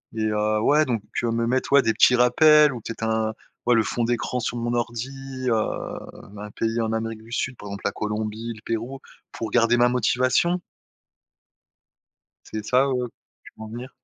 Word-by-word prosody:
et 110 -1 -1
heu, 105 0 +1
ouais, 150 +6 +4
donc 115 -6 -2 0.2
me 115 0 0
mettre, 130 +3 0
ouais, 140 -1 +7
des 110 - +2
petits 125 - +5
rappels 150 +4 +6
ou 120 - -7
peut-être 115 +1 -6
un 110 -1 0 0.3
ouais, 120 - +5
le 115 - +4
fond 120 - -2
d'écran 120 +1 -1
sur 120 - -3
mon 120 0 -2
ordi, 120 +1 -2 0.4
heu, 120 - +3 0.9
un 105 0 -7
pays 115 +2 -1
en 110 -1 -1
Amérique 110 0 -3
du 115 +1 -15
Sud, 130 +1 -2
par 105 - -10
exemple, 100 0 -7
la 100 - +1
Colombie, 110 +2 -4
le 110 - -14
Pérou 115 +4 -3 0.3
pour 115 -2 -5
garder 120 +1 +4
ma 120 0 +4
motivation? 130 +8 +2 1.8
C'est 110 -1 -6
ça, 130 +4 +3
heu, 140 - -1
où 125 -1 -1 0.4
tu - - -14
veux - - -8
en - - -7
venir? 120 +3 -7
115 Hz, 190 wpm, -24 LUFS, 110-125 Hz, 1.8 s, ouais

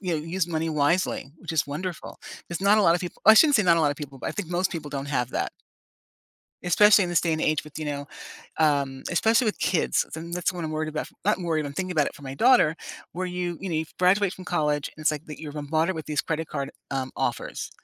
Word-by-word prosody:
you 180 -3 -1
know, - - +1
use 175 +1 -1
money 165 -1 -2
wisely, 150 -1 0
which 175 - -7
is 155 -5 +1
wonderful. 165 +5 -5 0.3
There's 170 +1 -4
not 200 +2 +5
a - - +4
lotta 170 -1 +4
people 175 - -7
I 220 - +10
shouldn't 290 +4 +7
say 215 - +3
not 170 -2 +5
a - - +2
lotta 145 -2 +1
people, 140 -3 -8
but - - -4
I - - -3
think 190 -5 -5
most 180 +1 0
people 160 -4 -5
don't 140 -1 -4
have 125 -4 -1
that. - - -2 1.1
Especially 205 +4 +6
in 175 - -4
this 170 - +3
day 165 - 0
and 155 - -1
age 155 -1 +1
with, 150 0 -9
you 155 - -4
know, 145 -1 -4 0.5
um, 140 -4 +1
especially 225 +6 +3
with 210 - -1
kids, 180 - +1
and 165 +2 -7
that's 180 +1 0
what 175 -2 -5
I'm 155 - -3
worried 155 0 -2
about 155 0 -3
f - - -12 0.2
I'm 185 - -8
worried, 160 -3 0
I'm 140 - -6
thinking 185 +4 -3
about 155 -5 +2
it - - -5
for 145 - -14
my 135 0 -6
daughter 235 - +4 0.4
where 185 +2 -3
you, 180 -2 -3
you 195 - -4
know, 170 - -2
you 160 +1 0
graduate 185 +1 +3
from 185 - -10
college, 150 -5 0
and 155 - -9
it's 155 - +4
like 150 +1 -5
that 150 -1 -9
you're 150 -1 -7
a - - -4
mother 160 +5 +1
with 160 -2 -6
these 150 -1 0
credit 160 0 -3
card, 140 -1 -4 0.2
um, 130 -1 -2
offers. - - -3
160 Hz, 260 wpm, -25 LUFS, 150-180 Hz, 1.1 s, I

